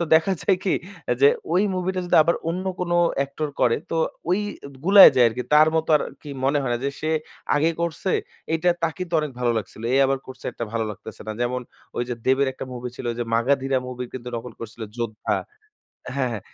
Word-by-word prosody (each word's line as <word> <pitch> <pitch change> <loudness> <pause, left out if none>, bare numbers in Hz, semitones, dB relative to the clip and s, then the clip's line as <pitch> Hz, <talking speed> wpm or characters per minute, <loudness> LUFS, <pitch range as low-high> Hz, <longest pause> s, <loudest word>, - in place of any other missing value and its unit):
তো - - +1
দেখা 160 +5 +4
যায় 190 - +3
কি 190 - +2 0.3
অ্যা - - +2
যে 140 - +9 0.2
ওই 185 +3 +4
মুভিটা 185 0 -1
যদি - - +3
আবার 170 +2 +2
অন্য 180 +3 -2 0.2
কোন 180 -1 -2 0.3
অ্যাক্টর 140 +2 -2
করে 115 - +4
তো - - -1 0.3
ওই 185 +4 +3 0.3
এদ 140 - -12
গুলায় 195 +1 +10
যায় 125 -2 +7
আরকি। 125 +3 -4
তার 155 +1 +7
মতো 160 0 0
আর - - -1 0.2
কি 150 - -10 0.2
মনে 140 +2 +3
হয় 125 - -2
না 120 - 0
যে, 140 - +1
"সে 155 - -1 0.5
আগে 160 +3 +3
করছে, 170 +2 -1 0.4
এইটা 165 +2 +2 0.2
তাকেই 165 +3 -2
তো - - -24
অনেক 150 -1 -3
ভালো 120 - +2
লাগছিল, 110 +1 -8
এ - - +4
আবার 135 0 +1
করছে 130 - -11
এরটা 115 - -5
ভালো 115 -1 0
লাগতেছে 105 +1 -10
না।" 110 - -3
যেমন 125 +1 -1 0.4
ওই - - +1
যে 125 - -1
দেবের 135 +2 +3
একটা 130 - -7
মুভি 125 0 -5
ছিল - - -8
ওই - - -9
যে - - 0
'মাগাধীরা' 135 +2 +1
মুভি 125 0 -5
কিন্তু 125 -1 -8
নকল 120 +2 -7
করছিল 115 0 -8
'যোদ্ধা' 115 -3 -2 0.8
হ্যাঁ, 135 -2 0
হ্যাঁ। 110 -4 -4
135 Hz, 220 wpm, -23 LUFS, 120-165 Hz, 0.8 s, গুলায়